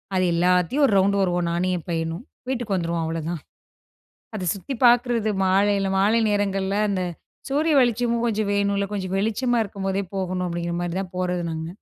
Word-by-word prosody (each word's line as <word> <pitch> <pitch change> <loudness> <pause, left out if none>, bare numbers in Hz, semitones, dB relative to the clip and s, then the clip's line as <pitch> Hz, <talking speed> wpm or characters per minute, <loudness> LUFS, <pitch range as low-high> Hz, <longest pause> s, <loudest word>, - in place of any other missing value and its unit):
அது 185 0 +2
எல்லாத்தையும் 180 - +2
ஒரு 215 - 0
ரவுண்டு 200 +1 +3
வருவோம், 175 -2 +1
நானும் 180 +2 0
என் 170 - -10
பையனும். 165 +3 -2 0.3
வீட்டுக்கு 240 -6 -1
வந்துருவோம். 170 -2 -1
அவ்வளோதான். 165 0 -3 0.9
அத 190 -4 -3
சுத்தி 205 +8 -6
பார்க்கிறது 240 -2 +3
மாலையில 195 +1 +2
மாலை 210 +4 +3
நேரங்கள்ல. 195 -1 0
அந்த 195 -2 -1 0.5
சூரிய 300 +3 +1
வெளிச்சமும் 240 -1 +1
கொஞ்சம் 215 -2 0
வேணுல, 200 0 +1
கொஞ்சம் 190 -2 -3
வெளிச்சமா 225 +4 +1
இருக்கும்போதே 195 -1 -3
போகணும் 185 -1 -2
அப்படிங்கிற 170 0 -3
மாரி 175 -1 -3
தான் 185 -2 -7
போறது 180 -1 -1
நாங்க! 160 0 -4
195 Hz, 155 wpm, -23 LUFS, 180-215 Hz, 0.9 s, ரவுண்டு